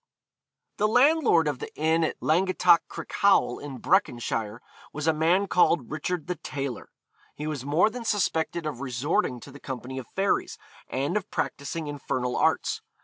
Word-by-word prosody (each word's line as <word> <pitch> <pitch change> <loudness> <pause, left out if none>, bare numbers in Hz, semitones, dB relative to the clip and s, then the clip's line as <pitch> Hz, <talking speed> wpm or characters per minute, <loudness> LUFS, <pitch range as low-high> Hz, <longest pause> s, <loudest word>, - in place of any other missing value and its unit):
The 210 - +2
landlord 250 - +4
of 145 -4 -2
the - - -7
inn 160 +2 +2
at 160 - -1
Langattock 180 +1 +4
Crickhowel, 200 -11 +1
in 145 -3 -7
Breconshire, 120 - 0 0.3
was 150 0 -5
a 160 - +4
man 170 +6 +2
called 175 -8 +2
Richard 155 +2 -3
the 180 0 -3
Tailor. 140 -4 -5 0.5
He 150 - -6
was 150 -4 -4
more 160 +9 +3
than 245 +1 -6
suspected 170 -6 0
of 140 -4 -4
resorting 130 -1 -1
to 140 - -11
the 140 - -12
company 130 0 -6
of 125 - -9
fairies, 195 +1 0 0.3
and 140 +7 -1
of 205 - -5
practising 150 +3 -3
infernal 130 -4 -3
arts. - - +1
155 Hz, 155 wpm, -26 LUFS, 135-180 Hz, 0.5 s, landlord